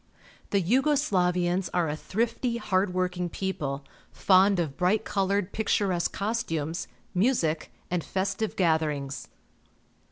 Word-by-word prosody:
The 200 - +2
Yugo 265 - +3
Slavians 180 - +1
are 175 -2 +2
a 150 - -2
thrifty, 235 +7 -1
hard 195 -3 +1
working 180 -1 -1
people, 145 -8 -3 0.3
fond 195 0 +4
of 155 -5 -1
bright 180 +6 +1
coloured, 195 0 0
picturesque 200 -5 +1
costumes, 175 -7 -2 0.3
music, 180 -6 +1 0.2
and 180 -2 0
festive 195 +3 -2
gatherings. 155 -5 0
185 Hz, 115 wpm, -27 LUFS, 170-205 Hz, 0.3 s, fond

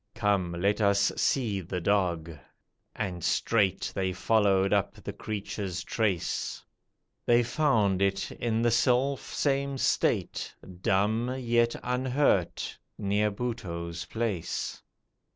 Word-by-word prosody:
Come, 100 -6 +1
let 100 +4 +1
us 100 -1 +3
see 115 -7 +1
the 90 +1 -4
dog," 85 -3 +1 0.6
and 90 -5 -3
straight 100 -5 +1
They 95 -1 0
followed 100 0 +3
up 100 -2 +1
the - - -7
creature's 100 -3 -4
trace. 100 -7 -1 0.6
They 120 0 +5
found 115 -8 +2
it, 95 0 0
in 115 -1 -1
the 120 - +3
selfsame 135 +3 +1
state, - - 0 0.3
Dumb, 110 +7 +1
yet 120 -2 +2
unhurt, 125 - +1 0.2
near 105 +1 +1
Buttoo's 85 -7 -4
place. 110 -7 -3
105 Hz, 105 wpm, -28 LUFS, 95-120 Hz, 0.6 s, They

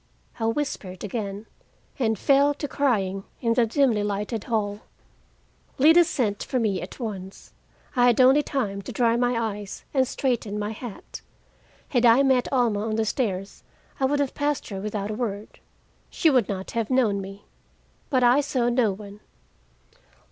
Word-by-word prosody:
I 225 - 0
whispered 225 -8 -3
again, 205 -1 -4 0.5
and 220 -4 +1
fell 280 +5 +3
to 290 - -4
crying 200 -10 0 0.2
in 230 -2 +1
the 230 0 +2
dimly 235 -3 +2
lighted 205 +2 -3
hall. 205 -3 -1 1.0
Lida 320 +5 +7
sent 210 -9 -1
for 260 - -2
me 210 -6 0
at 180 - -9
once. 195 -5 -7 0.4
I 245 -1 +5
had 240 0 +3
only 265 +3 +6
time 215 -10 -2
to 195 - -8
dry 235 -2 +2
my 245 0 +1
eyes 210 -3 -5
and 260 -2 +2
straighten 235 -7 -2
my 210 0 -2
hat. 220 -1 -9 0.7
Had 245 -3 +1
I 235 +4 +6
met 260 -2 +2
Alma 235 -6 +1
on 220 0 -2
the 225 0 +1
stairs, 200 -5 -2 0.4
I 270 - +2
would 285 +2 +1
have 280 -2 0
passed 290 -1 -2
her 195 -2 -5
without 210 0 -3
a - - -3
word. 210 -3 -5 0.5
She 320 - +2
would 250 -6 +2
not 190 -2 -4
have 230 -2 -2
known 225 -6 +2
me. 195 +1 -10 0.6
But 255 -4 +2
I 245 +4 +5
saw 255 -4 0
no 240 -3 +2
one. 200 +1 -10
230 Hz, 165 wpm, -25 LUFS, 205-260 Hz, 1.0 s, Lida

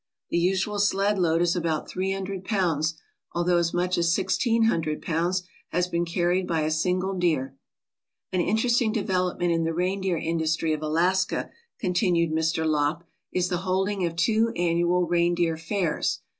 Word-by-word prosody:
The - - +1
usual 195 +4 0
sled 200 0 +2
load 165 -1 +2
is 175 0 +1
about 165 -3 -1
three 190 +1 -2
hundred 195 -1 -4
pounds, 165 -6 0 0.3
although 175 +1 +2
as 170 -1 0
much 180 0 0
as 170 -1 +2
sixteen 225 +4 +1
hundred 160 -8 +1
pounds 175 +3 -1 0.3
has 180 +1 0
been 170 -1 -1
carried 175 +2 0
by 165 -2 0
a 155 +1 0
single 180 +4 0
deer. 155 -8 0 0.8
("An 185 - +1
interesting 225 +4 +2
development 185 -4 0
in 165 0 +1
the 165 0 -1
reindeer 185 0 0
industry 160 0 0
of 155 - -3
Alaska/' 175 +5 0 0.3
continued 175 -2 +1
Mr. 160 +1 0
Lopp, 155 +2 0 0.3
"is 180 0 0
the 180 - 0
holding 190 +2 -1
of 165 - -6
two 220 +7 +2
annual 175 +1 +2
reindeer 170 -1 +1
fairs. 165 +1 -1
175 Hz, 155 wpm, -26 LUFS, 165-190 Hz, 0.8 s, sled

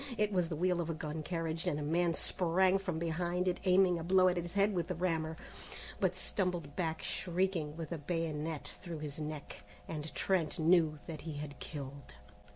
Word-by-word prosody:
It 210 0 +2
was 180 -3 +2
the 165 - -2
wheel 180 +2 +2
of 170 - -3
a 165 - -1
gun 155 0 -4
carriage, 165 0 -2
and 145 - +1
a - - -2
man 165 +2 +2
sprang 185 +2 +3
from 185 -4 -2
behind 175 +2 0
it, 180 - +1
aiming 185 -1 +5
a - - -4
blow 185 +1 +5
at 180 - 0
his 175 0 -3
head 200 +1 +3
with 170 -3 -1
a 180 - -1
rammer, 160 -2 0 0.6
but - - +2
stumbled 175 -7 -1
back 160 -3 -1
shrieking 175 -4 -1
with 165 -1 -5
a 170 - -2
bayonet 160 -1 -2
through 170 -2 -5
his 150 0 -5
neck, 150 -1 -5 0.3
and 155 -1 -4
Trent 185 -5 +1
knew 160 -2 +4
that 160 -3 -6
he 160 -1 -5
had 145 -1 -6
killed. 140 -2 -7
165 Hz, 195 wpm, -34 LUFS, 155-180 Hz, 0.6 s, aiming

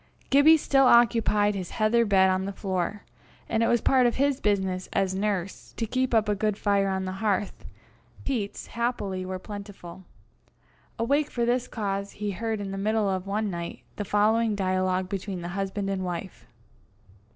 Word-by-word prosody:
Gibbie 290 +4 +7
still 270 -3 +3
occupied 215 -3 +4
his 185 -3 -5
heather 230 +2 +3
bed 190 -2 +4
on 185 0 0
the 200 - -3
floor, 190 0 -3 0.4
and 225 - 0
it 230 - +3
was 235 - +2
part 255 -2 +4
of 240 - 0
his 280 0 +1
business, 190 -3 -1
as 190 -1 +1
nurse, 195 -1 -3
to 230 - -1
keep 255 +1 0
up 220 -1 +3
a 210 - +2
good 210 0 -1
fire 200 -2 +1
on 190 0 -2
the 185 - -3
hearth: 205 -2 -1 0.6
peats, 225 -7 -3
happily, 210 -6 -2
were 185 0 -3
plentiful. 190 -3 -9 0.9
Awake 280 +6 +1
for 235 -1 -1
this 245 +1 0
cause, 200 -2 -3
he 210 0 -3
heard 220 +2 -3
in 200 -1 -5
the 195 - -4
middle 215 +1 +1
of 190 0 -2
one 210 +1 -1
night, 170 -1 -6 0.2
the 205 - -2
following 215 +2 +2
dialogue 185 -1 0
between 190 -2 -5
the 175 - -4
husband 195 +2 -3
and 195 -1 -2
wife. 180 +1 -6
205 Hz, 175 wpm, -26 LUFS, 190-225 Hz, 0.9 s, Gibbie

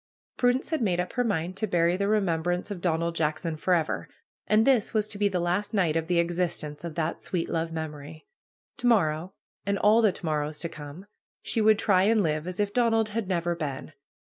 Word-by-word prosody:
Prudence 250 +4 +1
had 315 - 0
made 180 -6 +1
up 180 - -2
her 245 - +1
mind 180 -5 -1
to 215 - 0
bury 170 -1 +2
the 200 +1 -1
remembrance 180 -2 0
of 185 -4 -5
Donald 170 -1 0
Jackson 160 +1 -1
forever. 165 0 0 0.4
And 215 +1 +4
this 245 -5 +2
was 215 -1 +2
to 205 - -4
be 205 - +3
the 185 -2 -1
last 185 +5 -1
night 175 -6 +2
of 165 0 -1
the 175 -1 +1
existence 170 -3 -1
of 170 -3 -6
that 165 -1 -2
sweet 175 -3 -2
love 165 0 -2
memory. 155 -1 -7 0.5
To 245 -2 -1
morrow, 180 -5 +2 0.3
and 200 0 0
all 215 +4 +5
the 215 -3 +4
to 180 - -9
morrows 150 -1 -1
to 170 - -3
come, 150 +5 -10 0.4
she 225 - 0
would 215 0 +5
try 190 -3 +3
and 220 -1 +3
live 155 0 -1
as 180 +1 -5
if 205 -1 0
Donald 225 -3 +2
had 215 -1 -3
never 175 -2 0
been. 145 -5 -5
180 Hz, 210 wpm, -27 LUFS, 160-210 Hz, 0.5 s, all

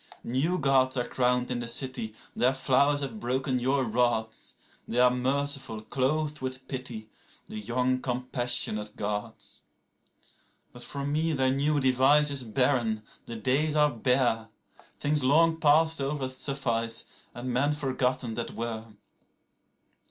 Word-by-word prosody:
15New 155 +9 0
Gods 135 -2 +2
are 120 - -1
crowned 125 0 +1
in 125 - -1
the 120 - -4
city; 115 -3 -2 0.2
their 130 +2 +2
flowers 140 +2 +2
have 125 -6 -5
broken 130 +2 -1
your 135 +2 +1
rods;16They 115 0 -2
are 125 0 +6
merciful, 135 -3 -2
clothed 150 +5 -1
with 130 0 -5
pity, 120 -5 -6 0.4
the 110 - -6
young 125 +4 0
compassionate 120 -4 -2
Gods.17But 105 +3 -9
for 140 +2 -5
me 155 +3 0
their 130 -2 +2
new 145 +2 +1
device 135 +3 +4
is 140 -2 0
barren, 120 -2 0 0.2
the 115 - -5
days 135 +7 +1
are 150 -1 +4
bare;18Things 125 +4 -1
long 160 +5 +4
past 160 0 +4
over 135 -1 -2
suffice, 125 -4 -2 0.3
and 125 +1 -4
men 140 +4 +2
forgotten 130 -4 -1
that 120 +1 -5
were. 115 -1 -4
130 Hz, 125 wpm, -28 LUFS, 120-140 Hz, 0.4 s, are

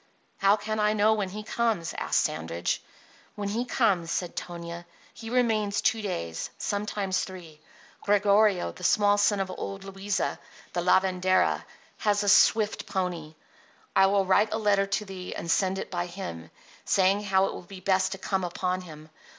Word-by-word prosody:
"How 195 +1 +5
can 215 +1 -3
I 210 0 +3
know 215 +1 +4
when 205 -3 -1
he 210 +3 -7
comes?" 220 -7 -1
asked - - +1
Sandridge. 80 +2 -2 0.5
"When 205 -1 -3
he 230 +4 -1
comes," 195 -10 +1
said 175 0 -2
Tonia, 170 0 -7 0.3
"he 225 - -9
remains 220 -4 +1
two 220 0 +1
days, 85 - -4
sometimes 200 -2 -2
three. 170 -5 -10 0.4
Gregorio, 205 -1 +3
the 180 - -13
small 205 +2 +4
son 205 0 +3
of 190 -1 -2
old 195 +1 -6
Luisa, 195 0 -2 0.3
the 175 - 0
lavendera, 185 +1 +2 0.4
has 205 -1 +1
a 205 - +2
swift 210 +1 +4
pony. 175 -5 -3 0.6
I 195 0 +6
will 195 0 +2
write 205 +3 +3
a 220 - 0
letter 200 -2 +2
to 200 +2 -1
thee 185 -2 -7
and 170 - -3
send 190 +1 +1
it - - -6
by 175 -1 -2
him, 85 - -7 0.3
saying 195 +2 +3
how 190 -1 +3
it - - -3
will - - -7
be 185 +1 -11
best 190 0 +1
to - - -6
come 190 0 -2
upon 180 +1 -2
him. 155 -3 -11
195 Hz, 170 wpm, -27 LUFS, 180-205 Hz, 0.6 s, I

